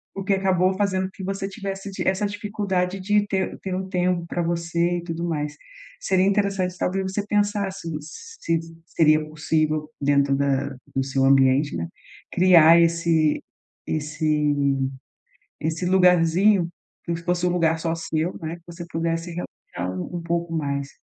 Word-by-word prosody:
o 195 - -4
que 195 +1 +1
acabou 190 -1 +2
fazendo 190 -1 0
com 190 - -6
que 195 - -10
você 195 +1 -3
tivesse 195 -1 -5
di 190 - -4
essa 190 +2 +1
dificuldade 200 -2 -2
de 205 +2 +2
ter 190 -2 -1
ter 190 - -4
um 190 0 -3
tempo 180 -2 0
pra 175 - -2
você 170 +1 0
e 170 - -5
tudo 165 0 -4
mais. 150 -2 -2 0.4
Seria 190 -1 +2
interessante, 195 -2 0
talvez, 190 +2 -1
você 205 +1 -2
pensar 205 -1 0
se 190 -3 -9
se 165 - -4 0.3
seria 155 -1 +3
possível 155 0 -1
dentro 140 -1 +3
da 140 0 0 0.3
do 135 - +1
seu 135 0 0
ambiente, 135 +1 +4
né, 85 0 -3 0.4
criar 170 -2 +7
esse 165 -2 +2 0.5
esse 150 -1 0 1.1
esse 160 +3 -2
lugarzinho 180 +1 +4 0.4
que 170 - -1
fosse 175 +1 -1
um - - +2
lugar 165 -2 +2
só 165 0 -1
seu, 165 +1 -2
né, 160 +1 -4
que 170 - -22
você 170 0 -8
pudesse 165 +1 -2
relaxar 90 - -6
um 90 - -5
um - - -5
pouco 170 0 -2
mais. 140 -3 -2
170 Hz, 160 wpm, -24 LUFS, 155-190 Hz, 1.1 s, criar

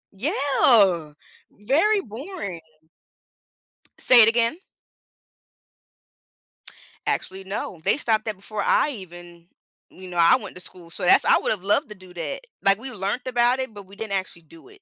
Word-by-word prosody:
Yeah! 210 - +2 0.4
Very 320 - +1
boring. 230 - -7 1.4
Say 245 -3 +7
it 215 - +6
again? 230 +4 +1 2.5
Actually, 190 +1 -3
no. 190 -3 -6
They - - +2
stopped 225 -6 0
that 215 -2 -3
before 205 +2 -6
I 300 - +2
even 175 -5 -11 0.4
you 185 0 -12
know, 175 - -7
I 170 +5 +6
went 210 -6 -9
to 180 - -8
school, 175 -1 -9
so 170 - -6
that's 180 - +5
I - - +4
would - - -2
have 200 -4 -3
loved 205 +2 +1
to 210 - -9
do 185 -2 -16
that. - - -3 0.2
Like, 195 +1 +3
we 265 +4 -6
learned 205 +4 -4
about 245 +1 +2
it, 260 -2 -3
but 205 -1 -10
we 195 +2 -16
didn't 215 -1 -6
actually 185 -3 -4
do 160 +1 -17
it. 405 -1 -18
205 Hz, 160 wpm, -23 LUFS, 185-245 Hz, 2.5 s, Say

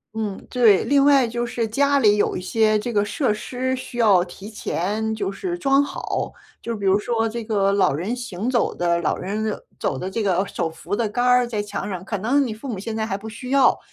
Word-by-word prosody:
嗯， 215 -3 -4
对。 230 -6 +4
另 280 -1 +3
外 280 -3 +5
就 240 +1 -2
是 235 -1 -2
家 280 +6 +2
里 210 -5 +4
有 - - +1
一 - - -3
些 215 +3 +2
这 240 +3 -3
个 205 -2 +2
设 210 +3 0
施 255 +4 -3
需 250 -1 -8
要 205 -6 +5
提 190 +3 -10
前 215 +1 -2
就 200 -2 -2
是 350 - -4
装 275 -4 +3
好， 285 - -3 0.3
就 235 - -3
比 205 -2 -5
如 195 +1 +4
说 225 +1 0
这 230 0 -5
个 200 -3 +2
老 200 -8 +3
人 180 - -2
行 235 -3 -4
走 240 -3 +1
的 170 -1 +1
老 160 - 0
人 215 +3 -3 0.2
走 135 - -1
的 185 - -4
这 225 - -2
个 190 -2 +1
手 165 - -2
扶 160 +4 -8
的 235 - +1
杆 245 +4 -1
儿 250 0 +4
在 215 -3 -2
墙 205 - -5
上。 185 -2 -5
可 205 +2 -3
能 260 +8 +2
你 230 - -3
父 220 +6 -9
母 230 -6 -3
现 215 +4 -5
在 220 0 -1
还 195 -3 -2
不 215 +2 -8
需 250 +3 -8
要， 275 -1 +4
220 Hz, 255 characters per minute, -22 LUFS, 200-245 Hz, 0.3 s, 外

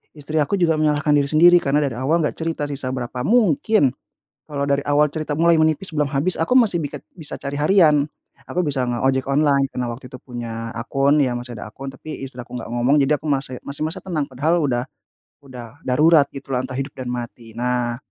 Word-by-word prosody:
istri 155 +1 -2
aku 150 +7 +1
juga 165 -2 +3
menyalahkan 150 -1 +2
diri 140 -1 +2
sendiri 175 +4 +7
karena 145 -1 +1
dari 135 -5 -2
awal 155 +6 +1
enggak 150 - -2
cerita 165 -2 -2
sisa 135 -2 -3
berapa. 125 0 -4
Mungkin 210 - +3 0.6
kalau 140 -1 -1
dari 140 0 +1
awal 145 +1 +3
cerita 155 -1 -4
mulai 170 +1 +4
menipis 160 +3 +1
belum 150 -2 +1
habis 150 +6 0
aku 165 +9 0
masih 225 -7 +2
bisa 145 - -5
biket - - -32
bisa 160 -5 -6
cari 140 0 -5
harian, 150 -1 +4 0.5
aku 180 - 0
bisa 135 -3 0
nge-ojek 130 +2 0
online 140 -1 +3
karena 125 -1 -3
waktu 125 +2 -10
itu 130 - -8
punya 115 -2 -6
akun, 135 +5 +2
ya 130 - 0
masih 120 0 -7
ada 105 - -7
akun, 135 +5 -9
tapi 155 +3 -8
istri 135 - -8
aku 125 0 -8
enggak - - -7
ngomong 120 +4 +2
jadi 140 +2 +3
aku 155 - -6
mase 135 -2 -2
masih 140 - -6
merasa 160 - -4
tenang, 165 -6 -2
padahal 150 +7 +1
udah 120 -4 0 0.6
udah 125 +1 -11
darurat 150 +3 +5
gitulah 135 -2 -3
antara 130 0 -6
hidup 135 +1 -5
dan 130 -2 -6
mati. 120 -2 -7
Nah, 120 -1 -1
140 Hz, 210 wpm, -21 LUFS, 125-155 Hz, 0.6 s, sendiri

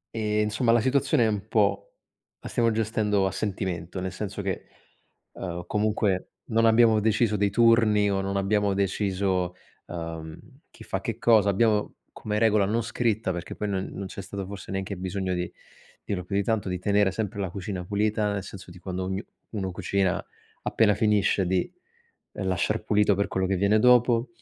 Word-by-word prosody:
e 105 -1 0
insomma 110 +3 +1
la 120 - +5
situazione 130 -1 +2
è - - +3
un 105 -1 -2
po' 100 -2 +1 0.5
la - - -9
stiamo 115 -1 +2
gestendo 110 -2 +1
a 95 - 0
sentimento, 95 -4 -3
nel 95 0 -3
senso - - -5
che, - - -3 0.7
ehm, 90 -2 -5
comunque 105 -2 0 0.2
non 115 0 +2
abbiamo 115 -1 +5
deciso 110 0 +2
dei 100 0 +1
turni 110 -2 +4
o 95 0 0
non 100 0 -1
abbiamo 100 0 +1
deciso, 95 -2 0 0.3
ehm, 80 -2 -6 0.3
chi - - -14
fa - - -4
che - - -4
cosa, 110 -4 +4
abbiamo 105 +1 +1
come 105 0 -3
regola 105 -2 +4
non 110 +4 0
scritta 110 -4 -1
perché 85 0 -6
poi 105 - -3
non 95 -1 -2
non 100 0 -5
c'è 100 - -7
stato 100 0 -6
forse 100 -2 -8
neanche 95 0 -3
bisogno 95 0 -2
di 90 0 -3 0.5
dirlo 90 -3 -3
più 100 +2 -3
di 100 - +2
tanto, 105 -4 -1
di 90 - -2
tenere 100 +1 +2
sempre 100 +1 -4
la 95 -3 -2
cucina 95 -1 -5
pulita, 105 +1 0
nel 100 - -2
senso 95 -2 -10
di 90 - -12
quando 95 +1 -4
ognu 95 +3 -3 0.3
uno 95 -4 -3
cucina 95 0 0 0.4
appena 105 -3 +3
finisce 105 -3 +2
di 90 0 0 0.6
lasciar 95 -3 -1
pulito 105 -1 +3
per 100 - +1
quello 95 0 -1
che 95 - +1
viene 100 +3 +3
dopo, 125 0 +4
100 Hz, 180 wpm, -26 LUFS, 95-110 Hz, 0.7 s, la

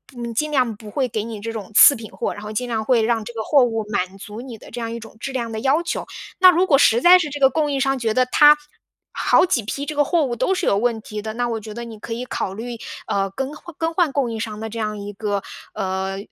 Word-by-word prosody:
嗯， 240 - -6
不 235 0 -4
尽 300 +7 -1
量 250 -6 +1
不 215 -1 -11
会 265 +3 0
给 220 -2 -2
你 225 -2 -6
这 230 +2 -4
种 215 -3 -7
次 285 - +9
品 225 -2 -9
货， - - -3
然 205 - -9
后 210 - -6
尽 245 +3 -2
量 220 -2 -2
会 240 -1 +3
让 225 -1 +1
这 240 - -8
个 225 - -4
货 280 +1 +4
物 225 -2 -2
满 185 -1 -2
足 210 +2 -9
你 245 -3 -9
的 - - -15
这 - - -6
样 230 -1 -4
一 235 - -5
种 225 -1 -13
质 270 - -5
量 235 -3 -3
的 220 - -4
要 275 +7 +2
求。 340 - -3 0.3
那 370 0 +9
如 355 +2 +2
果 295 -7 +4
实 235 -3 +4
在 360 +3 +8
是 310 -4 -2
这 290 0 -6
个 270 - +7
供 300 +1 0
应 275 - -1
商 270 -1 +1
觉 225 -2 0
得 255 +2 +3
他 295 +4 +6 0.5
好 - - +3
几 250 -10 0
批 275 +7 -4
这 305 - -5
个 290 - +4
货 335 0 +2
物 250 -4 -2
都 380 +11 +1
是 - - -2
有 200 - +3
问 230 0 0
题 210 -1 -6
的， 220 +1 -5
那 240 +2 -1
我 225 -1 -2
觉 215 0 -9
得 235 +2 -6
你 225 -2 -9
可 230 - -6
以 235 +2 -4
考 195 -6 -3
虑， 235 +3 -6 0.3
呃， 195 0 0
更 270 +7 -4
换 340 +1 -12
更 330 0 -1
换 340 -4 +2
供 260 -5 0
应 225 - -4
商 215 -1 -5
的 220 0 -5
这 230 +1 -6
样 215 -1 -2
一 205 0 -6
个， 205 -1 -2 0.3
呃， 190 0 -3
235 Hz, 315 characters per minute, -21 LUFS, 215-275 Hz, 0.5 s, 次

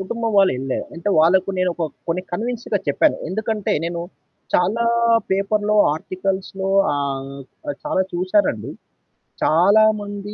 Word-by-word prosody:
కుటుంబం 230 +4 -3
వాళ్ళు 195 -1 +5
వినలే 130 0 -3 0.2
అంటే 170 +4 -4
వాళ్ళకు 180 +4 +4
నేనొక 180 -1 -1
ఒక - - -24 0.2
కొన్ని 175 +2 -1
కన్విన్స్‌గా 230 +1 -2
చెప్పాను, 140 - +3
ఎందుకంటే 215 +2 -2
నేను 170 0 -3 0.5
చాలా 205 +7 +2 0.5
పేపర్‌లో 205 +2 +1 0.2
ఆర్టికల్స్‌లో 190 +3 -3 0.2
ఆహ్, 135 -1 -3 0.4
ఆ! - - -1
చాలా 295 -11 +1
చూసానండి. 180 - 0 0.7
చాలామంది 205 +3 +2
190 Hz, 115 wpm, -21 LUFS, 170-210 Hz, 0.7 s, వాళ్ళు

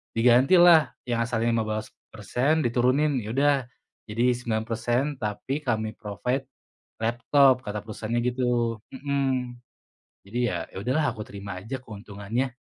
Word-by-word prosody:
digantilah, 135 +5 +6 0.2
yang 120 -1 +1
asalnya 115 0 0
15%, 110 +5 -2
diturunin, 130 +4 +2
"Ya 105 - -6
udah, 145 +1 +4 0.5
jadi 115 +4 +2
9%, 120 +1 -1 0.2
tapi 105 +6 -3
kami 110 -6 -1
provide 125 +6 -3 0.6
laptop," 130 +3 +4
kata 105 0 -4
perusahaannya, 110 +2 -3
gitu, 120 -2 0 0.2
mhm. 130 -3 -1 0.7
Jadi, 115 +5 -5
ya, - - -3
ya - - -13
udahlah, 140 +6 +1
aku 110 - -6
terima 100 -2 -7
aja 120 +6 -5
keuntungannya. 105 +3 -4
120 Hz, 120 wpm, -26 LUFS, 110-130 Hz, 0.7 s, digantilah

